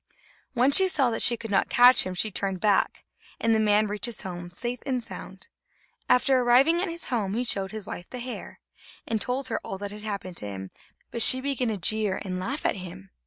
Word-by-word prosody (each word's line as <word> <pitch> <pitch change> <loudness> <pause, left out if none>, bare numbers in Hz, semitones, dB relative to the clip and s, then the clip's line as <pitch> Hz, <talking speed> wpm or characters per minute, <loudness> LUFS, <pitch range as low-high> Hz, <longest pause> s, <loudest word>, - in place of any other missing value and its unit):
When 255 +2 +3
she 380 +6 +6
saw 275 -9 +2
that 225 - -2
she 235 - +4
could 225 -1 -8
not 195 - +1
catch 245 -3 +6
him, 185 - -5
she 215 +4 +1
turned 195 -1 -2
back, 205 -1 +1 0.3
and 230 0 +2
the 220 - +2
man 210 0 +3
reached 210 +2 -2
his 235 - -3
home 175 -2 -7
safe 240 +7 -4
and 255 -3 -2
sound. - - -9 0.6
After 255 +1 +4
arriving 260 +8 +4
at 385 - -2
his 335 0 -5
home, 210 -5 -1
he 245 - -1
showed 195 -5 -1
his 215 -2 -7
wife 175 - -8
the 250 - -7
hair, 250 0 -8 0.5
and 220 -2 -2
told 255 +1 -1
her 225 - -2
all 195 - -6
that 200 +1 -6
had 210 +1 -9
happened 200 -4 -6
to 105 - -4
him, 95 -1 -7 0.4
but 235 - -2
she 260 +3 +8
began 265 -2 -2
to 220 -2 -2
jeer 210 +1 0
and 185 -1 -4
laugh 265 +11 -4
at - - +1
him. 170 - -10
220 Hz, 225 wpm, -26 LUFS, 195-250 Hz, 0.6 s, she